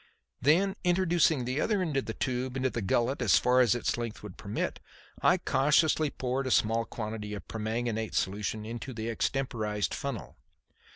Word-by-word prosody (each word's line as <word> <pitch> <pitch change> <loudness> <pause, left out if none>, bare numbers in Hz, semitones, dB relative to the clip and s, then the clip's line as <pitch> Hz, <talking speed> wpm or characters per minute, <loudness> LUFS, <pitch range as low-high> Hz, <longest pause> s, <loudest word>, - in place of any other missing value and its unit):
Then, 175 +9 +3
introducing 175 -6 +3
the 130 +4 -1
other 210 -3 +1
end 160 -5 -2
of 135 - 0
the 110 - -4
tube 130 0 -2
into 130 -1 0
the 120 - -3
gullet 120 +7 +1
as 105 -9 +5
far 125 +1 +4
as 120 -2 +4
its 120 - -1
length 115 -3 -5
would 105 -3 -8
permit, 105 0 -3 0.4
I - - +5
cautiously 150 +2 +3
poured 130 0 -2
a - - 0
small 115 -1 +2
quantity 105 -2 -5
of 100 - -7
the - - -10
permanganate 110 0 -2
solution 105 +2 -1
into 120 +3 -6
the 110 +1 -3
extemporized 110 - -1
funnel. - - -5
120 Hz, 175 wpm, -29 LUFS, 110-135 Hz, 0.4 s, as